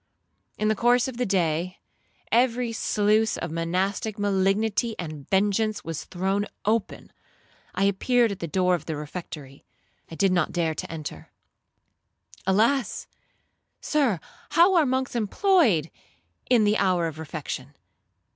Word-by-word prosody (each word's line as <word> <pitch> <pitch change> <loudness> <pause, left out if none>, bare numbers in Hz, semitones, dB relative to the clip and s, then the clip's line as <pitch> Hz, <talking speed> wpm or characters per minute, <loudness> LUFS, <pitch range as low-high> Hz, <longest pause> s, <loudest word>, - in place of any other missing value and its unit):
'In 215 - 0
the 215 - +3
course 240 +3 +3
of 260 -3 -6
the 250 -1 0
day, 175 -1 0 0.5
every 240 0 +2
sluice 215 0 +1
of - - -4
monastic 185 +6 -1
malignity 205 +3 +1
and 155 -5 -7
vengeance 205 +2 +1
was 165 -2 -5
thrown 195 +3 -1 0.2
open. 220 0 -1 0.6
I - - +1
appeared 230 +4 +2
at 200 - -6
the 170 - -4
door 180 +2 +2
of 175 - -2
the 160 - -2
refectory. 150 -2 -8 0.5
I 165 - -8
did 195 +2 +2
not 175 -4 +1
dare 165 -2 0
to - - -6
enter. 155 -2 -7 1.2
Alas! 225 +5 +2 0.7
Sir, 270 - +1 0.3
how 345 +4 +5
are 330 -5 +4
monks 260 0 -1
employed 230 - +2 0.6
in 240 -3 +5
the 210 +1 +2
hour 185 -3 +2
of 160 -1 -5
refection? 145 -3 -6
200 Hz, 135 wpm, -25 LUFS, 170-230 Hz, 1.2 s, how